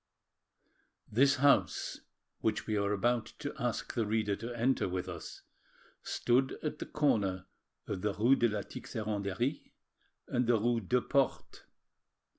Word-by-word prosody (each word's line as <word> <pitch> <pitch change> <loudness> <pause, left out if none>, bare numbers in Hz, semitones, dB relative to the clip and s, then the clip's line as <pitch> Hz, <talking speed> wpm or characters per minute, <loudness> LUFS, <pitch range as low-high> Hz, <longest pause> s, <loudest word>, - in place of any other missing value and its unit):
This 135 +6 +5
house, 140 +1 +2 0.4
which 110 -1 0
we 110 - -1
are 100 0 +1
about 115 +3 +1
to 145 - -5
ask 120 -3 -2
the 115 - +1
reader 105 -1 +1
to 115 +3 -6
enter 125 -3 +2
with 90 0 -3
us, 85 -3 -8 0.6
stood 130 +2 +1
at 155 - -3
the - - -5
corner 100 -11 +1 0.4
of 95 - -4
the 105 0 -1
rue 120 +6 +5
de 120 - +3
la 105 -1 -2
Tixeranderie 110 +4 -3 0.5
and 125 -1 0
the 120 -2 +4
rue 120 +2 +2
Deux 125 +5 +1
Portes. 140 0 0
115 Hz, 140 wpm, -32 LUFS, 100-125 Hz, 0.6 s, This